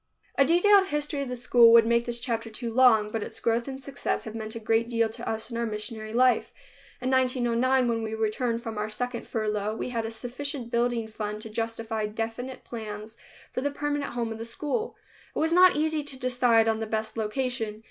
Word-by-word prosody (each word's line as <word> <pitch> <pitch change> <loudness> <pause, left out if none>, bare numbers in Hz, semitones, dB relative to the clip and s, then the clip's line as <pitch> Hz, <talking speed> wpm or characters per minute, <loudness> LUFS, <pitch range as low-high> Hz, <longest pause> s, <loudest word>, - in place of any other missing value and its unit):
A 275 - +5
detailed 385 +5 +5
history 295 -1 -2
of 275 - -4
the 250 - -3
school 240 -1 +6
would 230 -1 +8
make 235 +1 +2
this 240 0 -1
chapter 230 -2 -2
too 230 +1 -5
long, 225 -4 +5
but 225 - -2
its - - -7
growth 230 +2 0
and 265 -1 -5
success 275 0 -3
have 220 - -7
meant 220 0 -6
a - - -4
great 225 +1 +1
deal 230 -1 +2
to 220 - -6
us 220 +2 -3
in 230 - -3
our 235 - 0
missionary 215 0 -5
life. 250 +2 +3 0.5
In 255 +1 -1
1909, 255 0 +2
when 230 -1 0
we 220 0 -3
returned 230 +2 -1
from 225 -2 -4
our 210 +1 -2
second 245 +2 -4
furlough, 215 -1 -1
we 225 - -4
had 230 -2 -2
a - - -4
sufficient 245 +2 -5
building 235 -1 +1
fund 210 -1 -5
to 220 - -8
justify 225 -1 -2
definite 225 +4 -5
plans 215 -1 -7 0.4
for 255 - -2
the 285 - 0
permanent 290 0 -2
home 235 -2 -2
of 225 - -6
the - - -4
school. 295 - -3 0.4
It - - -4
was 320 +1 +1
not 365 +1 +7
easy 310 0 0
to 280 -2 -7
decide 245 -3 +3
on 220 0 +1
the 220 - -3
best 220 0 -2
location. 225 -1 -2
235 Hz, 215 wpm, -27 LUFS, 220-255 Hz, 0.5 s, would